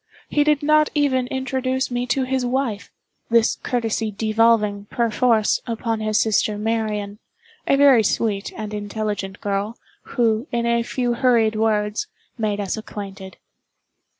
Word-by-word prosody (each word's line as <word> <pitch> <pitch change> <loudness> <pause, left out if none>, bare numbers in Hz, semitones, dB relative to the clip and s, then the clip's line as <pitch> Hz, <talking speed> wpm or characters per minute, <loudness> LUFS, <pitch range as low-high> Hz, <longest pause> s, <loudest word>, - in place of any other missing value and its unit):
He 295 - +3
did 300 -1 +2
not 305 0 +4
even 260 -4 +2
introduce 260 0 -2
me 245 0 -2
to 260 +2 +1
his 260 0 -1
wife—this 235 -2 -1
courtesy 225 -2 -1
devolving, 215 -1 +2
per 235 +2 -1
force, 225 -2 +2
upon 230 -1 -2
his 215 -1 +1
sister 210 -1 +1
Marian—a 220 - -3
very 275 -4 +6
sweet 205 -1 -1
and 215 -1 -5
intelligent 205 -1 -4
girl, 205 +3 -2 0.4
who, 230 +2 +2
in 235 0 0
a 235 0 +2
few 245 +1 -1
hurried 235 -3 +2
words, 215 - 0 0.3
made 215 -3 -1
us 200 +1 -2
acquainted. 195 -3 -8
225 Hz, 130 wpm, -22 LUFS, 210-255 Hz, 0.4 s, very